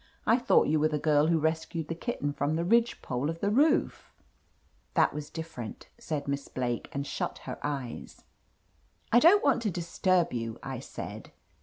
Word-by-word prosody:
I 230 +3 +4
thought 250 - +4
you 155 +1 +2
were 155 - +4
the 155 -1 -1
girl 150 0 +3
wfio 165 -1 +3
rescued 160 0 -1
the 165 - -2
kitten 165 - -3
from 145 +2 -1
the 170 +1 -1
ridge 235 +4 +2
pole 130 +4 -2
of 165 0 -4
the 200 +2 0
roof 295 +7 +2 0.4
!" - - -39
"That - - +4
was 150 0 -6
different," 160 -9 -7
said 155 -11 -4
Miss 140 0 -2
Blake, 120 -2 -3
and 140 0 -3
shut - - -3
her - - -6
eyes. 140 -5 -5 0.9
"I 240 - +7
don't 355 +9 +6
want 270 -4 +3
to 220 - 0
disturb 175 0 +1
you," 115 -1 -3
I 130 -2 -5
said. 135 - -8
160 Hz, 185 wpm, -29 LUFS, 140-185 Hz, 0.9 s, I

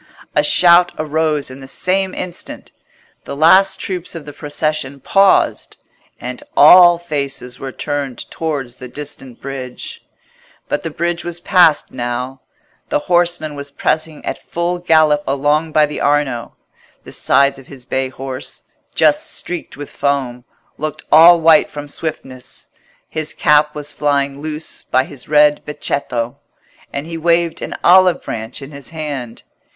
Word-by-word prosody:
A 150 - +4
shout 175 +3 +5
arose 155 -2 -1
in 130 - -10
the 135 - -11
same 190 +5 0
instant; 180 -2 -7 0.5
the - - -6
last 190 +6 +5
troops 180 -2 -5
of 160 -3 -8
the 145 - -9
procession 150 -2 -3
paused, 195 +7 +2 0.4
and 125 0 -6 0.2
all 175 +3 +8
faces 140 -6 -4
were 135 - -6
turned 140 -2 -4
towards 140 -7 -4
the 125 - -9
distant 135 -2 -8
bridge. 130 -2 -7 0.6
But - - -1
the 165 - -4
bridge 170 +2 -2
was 175 0 -4
passed 175 -4 +3
now: 125 +1 -4 0.5
the - - +2
horseman 175 - 0
was 140 0 -7
pressing 155 +2 -2
at - - -4
full 175 +1 -2
gallop 155 -3 +3
along 145 +4 +1
by 155 0 +4
the 150 - -6
Arno; 145 -5 0 0.5
the - - -12
sides 140 0 +2
of 135 - -16
his 130 -3 -11
bay 130 +1 -1
horse, 130 0 -7 0.3
just - - +3
streaked 175 -5 -4
with 145 0 -8
foam, 130 -4 -2 0.3
looked 155 0 -4
all 170 +2 +8
white 160 -1 +5
from 145 0 -8
swiftness; 135 -4 -7 0.4
his 155 -1 -5
cap 150 0 +3
was 150 0 -5
flying 140 -1 -1
loose 155 +1 -5
by 130 +1 +1
his 135 -1 -11
red 150 0 +4
becchetto, 125 -5 -3 0.5
and 140 +1 -4
he 165 0 -6
waved 170 0 +1
an - - -5
olive 185 0 +5
branch 110 +5 -6
in 135 - -10
his 140 -1 -9
hand. 145 -7 -6
150 Hz, 145 wpm, -17 LUFS, 135-165 Hz, 0.6 s, all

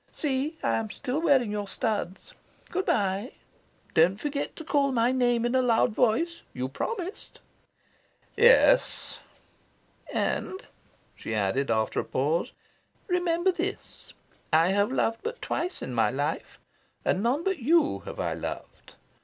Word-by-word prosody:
"See, 295 +2 -1
I - - +2
am 220 -1 -3
still 275 +6 -3
wearing 270 -9 +3
your 205 -1 -3
studs. 200 -4 -3 0.4
Good 380 - -2
bye. 200 +3 0 0.6
Don't 180 +5 +4
forget 285 +1 -3
to 320 - -8
call 285 -3 +1
my 240 0 +2
name 245 -2 +2
in 240 - 0
a 260 - +4
loud 235 -1 +3
voice. 255 +10 +1
You 130 +1 -3
promised." 380 - -5 1.0
"Yes." - - +4 0.9
"And," 375 - -2 0.5
she 110 - -5
added, 105 +7 0
after 110 -1 +1
a - - 0
pause, 160 - -1 0.6
"remember 355 0 +2
this. 370 +3 -5 0.4
I 165 +2 +4
have 200 +4 +2
loved 230 -3 0
but 470 +2 -5
twice 360 +2 -3
in - - -5
my - - +3
life; - - -3 0.5
and 185 - +1
none 255 +8 +1
but 385 -3 -1
you 300 +4 +3
have - - -7
I - - -1
loved. - - -7
250 Hz, 140 wpm, -27 LUFS, 205-335 Hz, 1.0 s, Don't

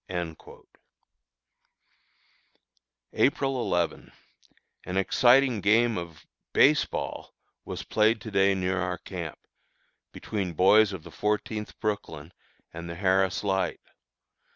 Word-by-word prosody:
April 135 -1 +1
11. 85 -6 -2 0.7
An 90 +1 -4
exciting 125 +3 +4
game 115 +3 +3
of 85 -4 -10 0.3
"base 145 +2 +5
ball" - - -6 0.3
was - - -6
played 110 +1 +2
to 110 - -8
day 95 0 +3
near 95 0 -1
our 90 0 -2
camp, 85 -5 -7 0.7
between 95 -5 -4
boys 100 +5 +5
of 95 -5 -7
the 85 - -12
Fourteenth 105 +5 -3
Brooklyn 95 -6 -4 0.4
and 85 +1 -7
the 85 - -6
Harris 95 +1 +1
Light. 95 -1 -1
95 Hz, 105 wpm, -27 LUFS, 90-110 Hz, 0.7 s, base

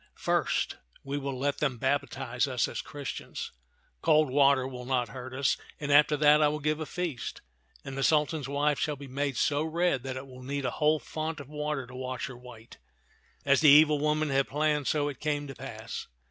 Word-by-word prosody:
" - - -40
First, - - 0 0.3
we 140 +1 -3
will 135 -1 -4
let 140 +2 -1
them 135 -5 0
baptize 130 -1 -1
us 125 -3 0
as - - -4
Christians 145 -2 -6 0.2
— - - -40
cold 155 -3 +4
water 140 -1 +4
will 125 -2 -7
not 125 -3 0
hurt 130 +1 -8
us 135 +1 +1
— - - -21
and 145 -1 -2
after 150 +1 +6
that 150 +1 +6
I 150 - +5
will 150 +1 -1
give 155 +1 0
a 155 - -4
feast; 170 -9 -4 0.4
and 135 - -6
the 135 - -2
Sultan's 150 -1 +2
wife 145 +1 +1
shall 150 - 0
be 140 0 -10
made 140 0 -2
so 145 0 +2
red 160 -3 +1
that 130 0 -5
it 130 - -6
will 130 -1 -12
need 140 +1 -3
a - - 0
whole 155 +1 +2
font 155 +1 -4
of 140 -1 -10
water 150 -2 -3
to 125 - -14
wash 130 -1 -4
her 130 - -7
white." 120 -2 -13 0.7
As 140 +1 +4
the 155 - +7
evil 150 +1 +7
woman 150 +1 +1
had 135 0 +2
planned, 150 -1 0
so 145 -1 +1
it 140 -3 -5
came 145 -1 -1
to 135 - -7
pass. - - -7
140 Hz, 215 wpm, -29 LUFS, 130-150 Hz, 0.7 s, the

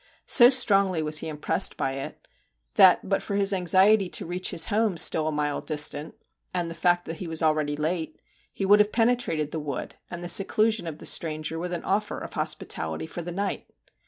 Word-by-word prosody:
So 240 -2 +7
strongly 200 -9 +3
was 150 0 +2
he 160 - -6
im 150 - -7
pressed 150 - 0
by 135 - -1
it, 135 0 -8 0.5
that - - +5
but - - 0
for 200 - -5
his 200 0 +2
anxiety 190 +2 +3
to - - -2
reach 180 +2 -2
his 160 - +1
home 215 -3 0
still 155 -1 +3
a - - -1
mile 150 -1 -2
distant, 150 0 -1 0.4
and 175 -2 -2
the - - -5
fact 175 +1 +1
that 165 - -6
he 180 - -7
was 160 0 -2
already 155 -2 +1
late, 160 +2 -3 0.3
he 195 - -4
would 205 +2 +5
have 210 0 +3
penetrated 225 -11 0
the 160 - -4
wood 150 -2 -6 0.2
and 175 0 -7
the - - -4
seclusion 215 +1 +2
of 155 -2 -6
the - - -12
stranger 155 0 0
with 180 +1 -5
an 175 - -4
offer 205 +2 -2
of - - -8
hospitality 80 0 -4
for 175 - -7
the 175 +1 -7
night. 200 +3 -4
175 Hz, 210 wpm, -25 LUFS, 155-200 Hz, 0.5 s, So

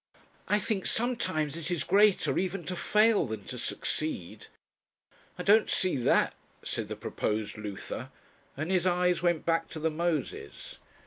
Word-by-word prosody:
"I 205 - +3
think 205 -1 -1
sometimes 220 - 0
it 170 0 -3
is 170 -5 0
greater 205 0 +4
even 185 0 -2
to 180 - -3
fail 210 - +3
than 110 -3 -5
to 125 - -6
succeed." 120 - -3 0.9
"I - - -4
don't 215 +2 +5
see 185 -4 +2
that," 125 - +3 0.3
said - - -3
the - - -5
proposed 105 0 -2
Luther, 105 -3 -6 0.5
and 155 +5 -2
his 185 -1 +2
eyes 180 0 +2
went 175 -2 +1
back 165 0 +1
to 160 - -6
the 160 +1 0
Moses. 160 -3 -3
170 Hz, 150 wpm, -29 LUFS, 150-190 Hz, 0.9 s, don't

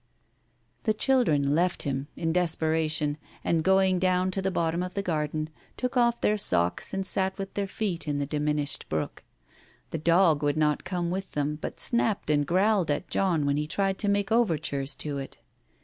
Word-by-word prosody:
' - - -43
" - - -42
The 215 -2 +2
children 160 - +2
left 175 +3 +1
him, 135 0 -2
in 165 -1 -1
desperation, 160 -3 +1 0.2
and, 165 -1 +1
going 190 0 +3
down 185 0 +2
to 195 - -2
the 190 - 0
bottom 170 -2 0
of 180 0 -5
the 200 - -1
garden, 155 -2 -2 0.3
took 250 0 -2
off 235 -1 +3
their 210 0 +2
socks 85 - +1
and 195 0 -2
sat 190 +1 +1
with 195 -1 -6
their 200 -1 -2
feet 190 -5 -3
in 145 -1 -1
the 145 - -1
diminished 150 0 -1
brook. 80 0 -3 0.7
The 165 - -3
dog 165 -1 +4
would 145 0 0
not 150 -1 +1
come 175 -1 -2
with 190 +1 -4
them, 150 +1 -1
but - - -5
snapped 225 -8 +1
and 145 -1 +2
growled 190 0 +2
at 145 +5 -1
John 175 -6 +1
when 140 0 +1
he 150 0 -1
tried 195 +3 -1
to 205 - +1
make 200 0 0
overtures 155 - +1
to 145 -2 -3
it. 135 - -8
170 Hz, 195 wpm, -27 LUFS, 150-195 Hz, 0.7 s, dog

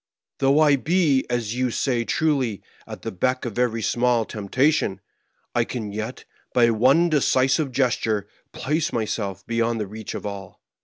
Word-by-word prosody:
Though 140 +2 +4
I 145 -2 +5
be, 155 -3 +2
as 120 -3 -1
you 125 +1 0
say 120 0 0
truly, 135 - 0 0.2
at - - -9
the - - -3
beck 125 +8 -1
of 120 -1 -4
every 115 -2 0
small 120 -1 +2
temptation, 115 +2 0 0.5
I - - +2
can 110 -5 -5
yet, 110 +2 -5 0.3
by 120 -1 +5
one 130 +10 +4
decisive 135 -1 +2
gesture, 115 -5 0 0.2
place 155 +3 -1
myself 100 -4 -3
beyond 115 0 0
the 105 - -2
reach 110 +2 -7
of - - -6
all. 100 -2 -7
120 Hz, 155 wpm, -23 LUFS, 110-135 Hz, 0.5 s, I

